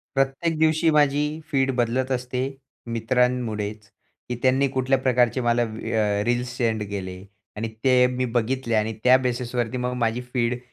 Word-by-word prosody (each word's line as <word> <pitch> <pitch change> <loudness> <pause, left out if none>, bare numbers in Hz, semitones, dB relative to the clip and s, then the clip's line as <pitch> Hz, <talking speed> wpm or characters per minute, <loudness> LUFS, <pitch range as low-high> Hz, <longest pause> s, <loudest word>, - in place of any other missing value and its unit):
प्रत्येक 135 +5 0
दिवशी 160 +1 +3
माझी 145 -1 +3 0.3
फीड 135 -2 +2
बदलत 125 +2 0
असते 125 0 -2 0.5
मित्रांमुळेचं, 115 -3 -1 0.4
की 125 - -3
त्यांनी 135 +2 +3
कुठल्या 130 0 +1
प्रकारचे 125 -1 +2
मला 120 0 +2
अ, 110 -2 -1
रील्स 120 +1 -1
सेंड 110 -3 0
केले 95 -1 -6 0.3
आणि 115 +2 -3 0.2
ते 125 -1 +5
मी 125 0 -2
बघितले 120 0 0
आणि 110 +1 +1
त्या 125 +1 +7
बेसिसवरती 120 -1 -2
मग 125 0 -2
माझी 115 +2 0
फीड 120 0 +1
125 Hz, 145 wpm, -24 LUFS, 115-130 Hz, 0.5 s, त्या